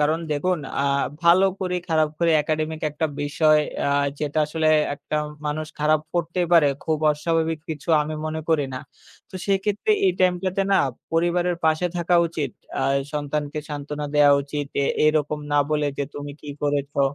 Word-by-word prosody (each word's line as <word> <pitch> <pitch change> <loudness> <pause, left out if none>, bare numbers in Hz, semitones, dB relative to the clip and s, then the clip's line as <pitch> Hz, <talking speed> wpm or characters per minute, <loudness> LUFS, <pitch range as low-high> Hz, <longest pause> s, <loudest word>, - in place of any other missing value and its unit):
কারণ 155 +2 +2
দেখুন 180 +4 0 0.2
আ - - 0 0.4
ভালো 175 +3 +6
খারাপ 190 0 -2
করি, 180 -1 -1
খারাপ 155 -2 +2
করি, 170 -1 +2
academic 155 0 -2
একটা 150 +2 -1
বিষয় 155 +1 +3 0.3
আ - - +2 0.3
যেটা 150 0 -1
আসলে 155 0 0 0.3
একটা 150 - -7 0.3
মানুষ 155 +1 -2
খারাপ 155 +1 +3
করতেই 175 +1 0
পারে। 165 -4 +7 0.2
খুব 155 -1 0
অস্বাভাবিক 160 +1 -1
কিছু 150 0 -7
আমি 155 +1 -4
মনে 160 0 -3
করি 160 -3 +2
না। 130 - -3 0.5
তো - - -16
সেক্ষেত্রে 200 - 0 0.2
এই 370 - +4
টাইমটাতে 185 +1 +1
না - - +5 0.4
পরিবারের 175 +1 +1
পাশে 160 +2 +2
থাকা 175 +1 +1
উচিত। 155 -5 -3 0.3
আ - - 0 0.3
সন্তানকে 150 0 -3
সান্ত্বনা 150 0 -5
দেওয়া 145 -1 +6
উচিত। 145 0 -4 0.2
এ - - +2 0.2
এরকম 150 -1 +1
না - - +3
বলে 150 -1 +1
যে - - +1
তুমি 145 0 -6
কি 150 - -9
করেছো? 145 -1 -1
155 Hz, 170 wpm, -23 LUFS, 150-170 Hz, 0.5 s, পারে